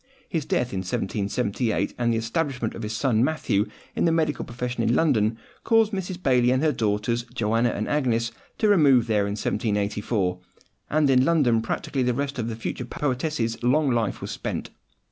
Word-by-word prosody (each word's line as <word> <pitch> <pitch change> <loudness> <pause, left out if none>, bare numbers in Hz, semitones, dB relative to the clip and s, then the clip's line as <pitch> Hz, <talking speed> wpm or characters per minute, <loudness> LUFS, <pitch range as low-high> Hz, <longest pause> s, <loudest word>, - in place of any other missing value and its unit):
His 160 -6 -2
death 125 -3 0
in 95 - -1
1778, 100 +5 -1
and 120 -1 +1
the 115 - +1
establishment 125 0 -2
of - - -7
his 105 0 -4
son 120 -4 +2
Matthew 125 -8 +1 0.3
in - - +1
the 165 - +4
medical 160 -2 0
profession 125 0 -4
in 115 +1 +2
London, 115 -8 +2 0.3
caused 225 -2 +3
Mrs. 190 -2 -4
Baillie 125 -2 +4
and 130 +3 +2
her 155 - +4
daughters, 110 0 0
Joanna 115 +1 +2
and 105 -2 -3
Agnes, 120 -6 0 0.3
to 215 - +2
remove 145 - +5
there 105 -3 +1
in 100 - -2
1784; 105 -3 -1 0.5
and 150 -1 +3
in 130 -1 +4
London 135 -8 +3
practically 130 +4 -2
the 125 -1 +1
rest 140 0 -3
of 115 - -2
the 115 - -3
future 115 +2 -4
poetess's 125 -3 -2
long 135 +3 +3
life 115 -4 -1
was - - -5
spent. - - -4
120 Hz, 180 wpm, -25 LUFS, 110-145 Hz, 0.5 s, remove